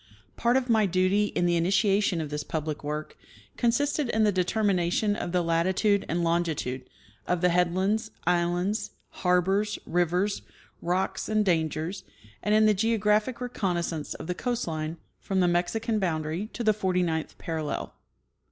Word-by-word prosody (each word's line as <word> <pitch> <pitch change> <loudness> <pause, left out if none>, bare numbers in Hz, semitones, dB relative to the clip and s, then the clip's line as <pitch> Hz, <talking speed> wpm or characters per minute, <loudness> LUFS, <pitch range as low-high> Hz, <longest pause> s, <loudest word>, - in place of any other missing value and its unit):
Part 240 +2 +2
of 260 -1 -1
my 220 -4 +3
duty, 185 +3 +2
in 175 - -1
the' 175 -1 +2
initiation 195 +1 +2
of 150 -2 -5
this 150 0 -3
public 155 -1 -4
work, 150 +1 -4 0.4
consisted 280 +3 +1
in 220 -1 +2
the 210 - +4
determination 190 +1 +1
of 175 - -4
the 180 -1 +1
latitude 185 +5 +1
and 170 +2 0
longitude 160 -7 -1 0.4
of 180 -1 0
the 180 - +4
head 180 0 +2
lands, 215 +4 0 0.2
islands, 175 +4 0 0.2
harbors, 190 +4 +1
rivers, 180 +4 0 0.4
rocks 185 +3 -1
and 215 -1 +2
dangers, 165 +1 -1 0.4
and 210 0 +2
in 215 0 +5
the 215 - +5
geographic 215 +2 +1
reconnaissance 175 -10 -2
of - - -8
the 180 - -2
coast 240 +5 -2
line 155 0 -3 0.2
from 195 -2 -1
the 180 - +4
Mexican 210 +6 0
boundary 165 +1 -2
to 240 - -4
the 215 -1 +4
forty 185 -3 0
ninth 160 -2 -2
parallel. 160 -3 -4
185 Hz, 155 wpm, -27 LUFS, 170-210 Hz, 0.4 s, in